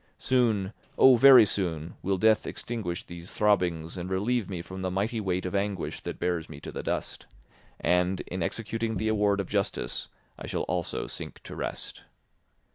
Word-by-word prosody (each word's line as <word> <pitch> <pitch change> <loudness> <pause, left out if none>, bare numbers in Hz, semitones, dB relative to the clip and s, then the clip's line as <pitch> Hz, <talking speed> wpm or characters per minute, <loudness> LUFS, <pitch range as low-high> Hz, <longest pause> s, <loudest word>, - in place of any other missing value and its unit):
Soon, 115 -6 +1 0.2
oh, 130 -1 +8
very 125 -2 +9
soon, 85 -5 -2
will 95 +1 0
death 110 +3 +3
extinguish 110 -4 -4
these 85 -2 -10
throbbings 90 -5 +1
and 90 +1 -4
relieve 105 +2 0
me 90 -3 -4
from 95 +1 -8
the 95 - -1
mighty 105 +5 -1
weight 95 -2 -1
of 90 - -3
anguish 100 -2 -2
that - - -5
bears 85 -3 -1
me 75 -2 -9
to - - -7
the - - -5
dust; - - -3 0.5
and, 90 +2 +2
in 90 0 -5
executing 115 +4 -2
the 110 - -1
award 105 -2 +2
of 100 - -2
justice, 100 -11 -2 0.3
I - - -7
shall - - -2
also 90 -2 -2
sink - - -6
to - - -8
rest. - - -5
95 Hz, 175 wpm, -28 LUFS, 90-110 Hz, 0.5 s, very